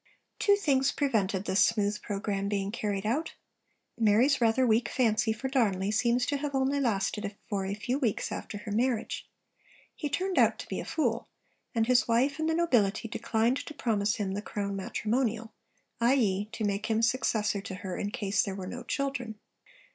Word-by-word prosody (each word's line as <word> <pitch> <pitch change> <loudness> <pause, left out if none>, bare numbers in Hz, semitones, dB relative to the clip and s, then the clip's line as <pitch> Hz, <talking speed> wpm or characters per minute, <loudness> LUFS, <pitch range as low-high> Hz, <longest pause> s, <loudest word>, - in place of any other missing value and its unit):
Two 405 - +5
things 275 -9 +2
prevented 205 -9 0
this 190 - +4
smooth 210 -2 +1
programme 200 -1 -2
being 200 -1 -1
carried 205 -3 -2
out. 270 +9 -1 0.6
Mary's 230 +6 +4
rather 235 +3 +3
weak 225 -1 +2
fancy 225 -2 +2
for 220 +5 -3
Darnley 205 -7 +1
seems 235 +3 +2
to 285 - 0
have 280 0 -3
only 270 +1 +1
lasted 210 -3 -1
for 195 -2 -2
a 200 - -2
few 245 +6 -2
weeks 235 -8 -1
after 205 - -5
her 210 +1 -7
marriage. 235 +1 -1 0.7
He 295 - -3
turned 370 +6 0
out - - +4
to - - -8
be - - -3
a - - -5
fool; 240 -7 -1 0.5
and 225 -1 +3
his 250 +1 +3
wife 260 +6 +2
and 315 0 0
the 320 - +1
nobility 230 -11 +2
declined 225 +3 0
to 305 - -7
promise 215 -4 +1
him 200 -4 -2
the 205 - -3
Crown 200 -1 -3
matrimonial, 225 +3 -1 0.5
i.e., 220 -5 +2
to 230 -1 -4
make 205 +1 -1
him 225 0 +1
successor 220 -4 +1
to 190 - -6
her 185 -2 -5
in 205 - -2
case 205 -4 0
there 195 -2 -3
were 190 -1 -6
no 245 +6 -6
children. 270 -5 -3
225 Hz, 180 wpm, -29 LUFS, 205-260 Hz, 0.7 s, Two